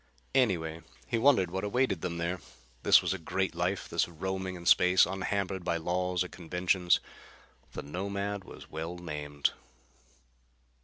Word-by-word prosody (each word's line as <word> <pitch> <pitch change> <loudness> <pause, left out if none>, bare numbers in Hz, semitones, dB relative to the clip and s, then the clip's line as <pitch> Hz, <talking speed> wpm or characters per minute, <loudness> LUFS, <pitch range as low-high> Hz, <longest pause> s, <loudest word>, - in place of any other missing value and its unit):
Anyway, 85 -11 +1 0.2
he 115 - 0
wondered 115 -9 +4
what 95 +2 -2
awaited 105 -4 +1
them 85 -2 -3
there. 85 +2 -2 0.4
This - - +6
was - - +1
a 95 - -4
great 95 +3 -1
life, 90 +3 -1
this - - +1
roaming 95 +2 -4
in 85 -1 -9
space, 90 +1 +6
unhampered 95 -1 -2
by 85 -1 0
laws 90 +2 0
or - - -5
conventions. 90 +1 +1 0.7
The - - -5
Nomad 100 +5 -3
was - - -12
well 80 +2 -4
named. 75 -4 -2
90 Hz, 145 wpm, -30 LUFS, 85-95 Hz, 0.7 s, This